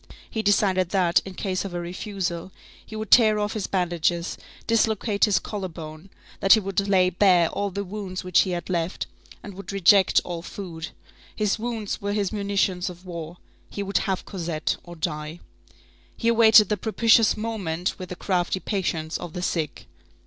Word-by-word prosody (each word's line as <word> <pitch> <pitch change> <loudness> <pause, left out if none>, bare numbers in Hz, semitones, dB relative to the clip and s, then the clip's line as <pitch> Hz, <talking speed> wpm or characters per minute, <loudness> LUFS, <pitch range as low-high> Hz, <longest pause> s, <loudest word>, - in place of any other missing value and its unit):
He 220 - -3
decided 195 -3 +2
that, 175 -3 +3
in 190 -1 -8
case 185 -1 -2
of 190 -3 -6
a - - -1
refusal, 180 0 -4 0.3
he 220 - -10
would 215 -2 -5
tear 220 -3 +7
off 210 0 -1
his 215 -3 -3
bandages, 175 -2 0 0.3
dislocate 220 -2 +2
his 210 -3 +2
collar 200 -3 -4
bone, 160 +1 -10 0.3
that 195 - +6
he 220 - +6
would 195 0 -1
lay 185 -2 +3
bare 180 -2 +4
all 200 0 -2
the 200 +1 -4
wounds 190 -1 -6
which 180 -1 +3
he 190 - +3
had 175 -1 -3
left, 170 -1 -2 0.4
and 205 - -8
would 195 0 -8
reject 195 0 +5
all 175 -2 -5
food. 170 -3 -7 0.5
His 210 0 0
wounds 225 -3 -3
were 200 0 -2
his 205 -1 -1
munitions 200 -3 0
of 180 +1 -12
war. 170 -1 -7 0.3
He 200 - -4
would 195 0 0
have 190 -2 -2
Cosette 170 -5 -2
or 175 -1 -10
die. 150 +1 -4 0.8
He 230 - +1
awaited 220 -3 +7
the 210 - +1
propitious 225 +2 +3
moment 195 -6 -3
with 185 - -7
the 180 - -5
crafty 180 0 -1
patience 170 -6 -2
of 170 - -7
the 180 - -4
sick. 160 -5 -2
190 Hz, 180 wpm, -24 LUFS, 175-205 Hz, 0.8 s, tear